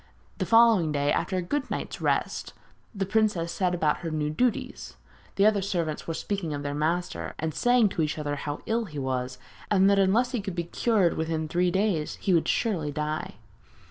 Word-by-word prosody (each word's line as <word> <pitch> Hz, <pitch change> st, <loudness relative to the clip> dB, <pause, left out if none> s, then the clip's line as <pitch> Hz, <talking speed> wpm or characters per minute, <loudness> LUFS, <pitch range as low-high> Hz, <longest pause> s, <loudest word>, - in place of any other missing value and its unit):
The -, -, -1 dB
following 225 Hz, -8 st, +5 dB
day, 145 Hz, 0 st, +1 dB
after 185 Hz, -, -1 dB
a 180 Hz, -, -1 dB
good 290 Hz, +10 st, -2 dB
night's -, -, -4 dB
rest, -, -, -1 dB, 0.4 s
the 195 Hz, -3 st, -2 dB
princess 195 Hz, -5 st, +1 dB
set 180 Hz, -3 st, 0 dB
about 155 Hz, -3 st, +1 dB
her 170 Hz, -, -5 dB
new 150 Hz, -1 st, -1 dB
duties. 245 Hz, +9 st, -2 dB, 0.4 s
The 200 Hz, -, +3 dB
other 210 Hz, -2 st, +4 dB
servants 170 Hz, -5 st, -2 dB
were 165 Hz, -, -2 dB
speaking 175 Hz, -7 st, -3 dB
of 145 Hz, -, -5 dB
their 145 Hz, 0 st, -3 dB
master, 165 Hz, +4 st, -2 dB
and 160 Hz, 0 st, -3 dB
saying 245 Hz, +1 st, +3 dB
to 170 Hz, -, -2 dB
each 150 Hz, 0 st, -1 dB
other 145 Hz, -1 st, -2 dB
how 145 Hz, +1 st, -5 dB
ill 230 Hz, +1 st, 0 dB
he 155 Hz, -7 st, -9 dB
was, 130 Hz, -1 st, -2 dB, 0.3 s
and 195 Hz, -2 st, +4 dB
that 200 Hz, -, +4 dB
unless 220 Hz, +6 st, +3 dB
he 245 Hz, -5 st, -1 dB
could 195 Hz, -3 st, -5 dB
be 170 Hz, -, -1 dB
cured 190 Hz, +1 st, +1 dB
within 160 Hz, 0 st, -2 dB
three 175 Hz, +3 st, +1 dB
days 190 Hz, -5 st, 0 dB
he 190 Hz, -, 0 dB
would 165 Hz, -, +2 dB
surely 170 Hz, -11 st, 0 dB
die. 150 Hz, +1 st, -3 dB
175 Hz, 200 wpm, -27 LUFS, 155-205 Hz, 0.4 s, following